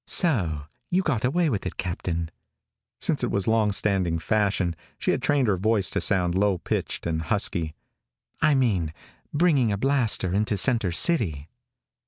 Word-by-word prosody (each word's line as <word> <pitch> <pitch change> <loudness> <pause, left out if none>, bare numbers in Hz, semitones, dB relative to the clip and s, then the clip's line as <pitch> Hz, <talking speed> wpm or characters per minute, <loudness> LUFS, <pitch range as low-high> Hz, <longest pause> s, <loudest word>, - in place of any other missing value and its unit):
"So 90 - +2 0.2
you 185 +2 +1
got 125 -11 -1
away 165 +7 +2
with 110 -9 -1
it, - - -7
Captain." 85 -2 -3 0.7
Since - - +1
it - - 0
was 100 -2 -1
long 110 -2 +2
standing 95 -5 0
fashion, 100 -1 0 0.2
she - - 0
had - - -1
trained 140 -4 +2
her 100 -3 +2
voice 105 0 +1
to - - -1
sound 90 -4 +2
low 95 0 +2
pitched - - -3
and 80 -1 -1
husky. 80 0 -2 0.7
"I 150 - +4
mean, 95 - +1 0.4
bringing 145 -8 +2
a 100 - -1
blaster 120 -7 +1
into 105 +1 0
center 115 -3 +2
city." 85 - +1
100 Hz, 160 wpm, -25 LUFS, 85-125 Hz, 0.7 s, I